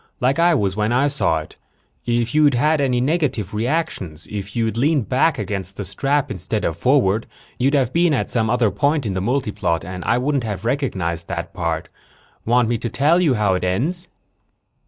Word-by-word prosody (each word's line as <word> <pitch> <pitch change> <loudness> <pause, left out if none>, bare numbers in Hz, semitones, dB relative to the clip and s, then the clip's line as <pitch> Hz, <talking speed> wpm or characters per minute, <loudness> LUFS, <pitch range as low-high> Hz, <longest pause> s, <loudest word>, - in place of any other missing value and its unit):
Like 130 +5 +1
I 170 0 +4
was 100 -7 0
when 105 +1 0
I 130 +4 +3
saw 110 - +1
it. 75 - -14 0.5
If 120 -1 0
you'd 150 -3 +4
had 150 +4 +2
any 125 -3 +1
negative 130 - 0
reactions 105 - -2
if 100 -1 -6
you'd 115 -2 0
leaned 140 0 +1
back 135 +5 +2
against 100 -2 -4
the 100 - -4
strap 135 +8 0
instead 105 +2 -3
of 80 - -1
forward 115 - +2 0.3
you'd 135 +4 +2
have 130 -3 +1
been 170 0 +3
at 140 - 0
some 110 -2 +1
other 120 -3 +2
point 145 +4 +1
in 100 - -1
the 95 - -2
multiplot 105 - -1
and 90 0 -6
I 120 - +2
wouldn't 135 +1 0
have 105 -1 -4
recognized 95 - -1
that 85 0 -5
part. 85 -1 -2 0.6
Want 120 0 +3
me 115 -1 0
to 120 - -3
tell 150 +9 +3
you 150 -8 +3
how 105 -3 +2
it 90 - -1
ends?" 145 - -1
120 Hz, 195 wpm, -21 LUFS, 95-140 Hz, 0.6 s, I